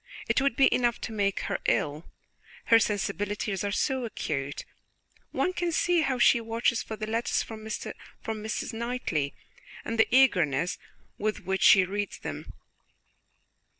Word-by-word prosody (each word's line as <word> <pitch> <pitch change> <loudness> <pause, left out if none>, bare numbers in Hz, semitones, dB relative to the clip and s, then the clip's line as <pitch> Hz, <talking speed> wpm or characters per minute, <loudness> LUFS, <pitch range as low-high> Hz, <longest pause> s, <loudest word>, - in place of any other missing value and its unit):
"It - - +2
would 275 -3 +1
be 270 - +5
enough 240 -1 +1
to - - -5
make 200 -2 0
her - - -2
ill, 150 +3 0 0.6
her 230 - +6
sensibilities 205 -1 -1
are 200 - -1
so 260 +4 0
acute! 145 -11 -4 0.6
One 365 - 0
can 350 -1 -1
see 345 +1 +2
how 270 -4 0
she 240 -1 +5
watches 230 +1 0
for 220 - -6
the 215 - -4
letters 225 +2 0
from 220 -1 -9
Mrs. 220 0 -5
Knightley, 225 - -2 0.5
and 230 0 -3
the 225 - +6
eagerness 180 - +3 0.4
with 210 0 -1
which 190 +1 -1
she 190 -2 +7
reads 205 +2 -3
them." - - -7
220 Hz, 145 wpm, -28 LUFS, 200-240 Hz, 0.6 s, she